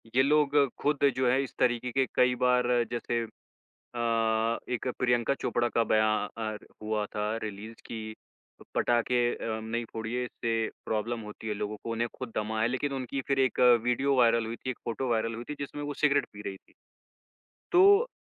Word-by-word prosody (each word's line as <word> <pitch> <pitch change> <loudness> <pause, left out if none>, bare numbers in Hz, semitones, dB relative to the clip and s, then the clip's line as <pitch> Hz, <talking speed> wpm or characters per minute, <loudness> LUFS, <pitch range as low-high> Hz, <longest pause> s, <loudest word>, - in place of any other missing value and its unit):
ये 130 - +6
लोग 145 0 +3 0.2
खुद 145 -1 +2
जो 130 0 +1
हैं, 130 - +3
इस 135 -2 -3
तरीके 125 0 +1
के 135 +1 +2
कई 125 0 +4
बार, 125 -1 +3
जैसे 120 0 -1 0.7
अ, 115 -1 +1
एक 125 0 -3
प्रियंका 120 +1 +2
चोपड़ा 120 0 +1
का 115 - +4
बयान 110 0 +1 0.3
हुआ 105 -1 -1
था, 105 +2 -2
रिलीज़ 110 +2 -6
कि 110 -1 -6 0.6
पटाखे 120 +1 +2
अ, - - -6 0.2
नहीं 115 +1 -3
फोड़िए, 115 +3 -3
इससे 115 -2 -2 0.2
प्रॉब्लम 115 +2 -2
होती 110 +1 -8
है 105 - -1
लोगों 105 +1 -4
को। 115 - -4
उन्हें 115 +1 -1
खुद 125 -4 -6
दमा 110 +1 -2
है, 115 - +3
लेकिन 140 +3 -2
उनकी 135 +1 -3
फिर 135 -1 +2
एक 130 -2 +1 0.2
वीडियो 135 +3 +2
वायरल 115 -2 +4
हुई 115 +1 -4
थी, 130 - -5
एक 125 - -5
फ़ॉटो 120 +3 -2
वायरल 115 0 0
हुई 120 +1 -6
थी, 150 - -2
जिसमें 145 +1 -5
वो 145 0 -4
सिगरेट 145 -1 +3
पी 105 0 -9
रही 95 - -4
थीं। - - -26 1.0
तो 400 +6 +6
120 Hz, 180 wpm, -29 LUFS, 110-130 Hz, 1.0 s, ये